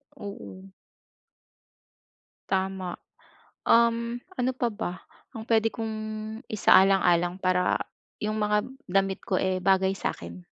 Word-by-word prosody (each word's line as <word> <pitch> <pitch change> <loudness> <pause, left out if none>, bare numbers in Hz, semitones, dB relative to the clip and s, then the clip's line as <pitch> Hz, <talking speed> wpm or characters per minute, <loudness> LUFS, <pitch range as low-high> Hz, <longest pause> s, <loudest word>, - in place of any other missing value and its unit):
Oo. 200 -2 -9 1.8
Tama. 190 -2 -1 0.7
Um, 235 0 +3 0.2
ano 250 +1 +1
pa 245 - +1
ba, 205 -4 -3 0.4
ang 220 -1 -6
puwede 225 -1 +3
kong 225 -1 -4 0.5
isaalang-alang 185 -4 +4
para 180 0 +2 0.4
yung 215 +1 -1
mga 210 0 +2 0.2
damit 195 +1 +1
ko, 185 - 0
eh, 185 -1 0
bagay 190 0 +3
sa - - -1
akin? 85 +1 -10
195 Hz, 110 wpm, -27 LUFS, 185-220 Hz, 1.8 s, isaalang-alang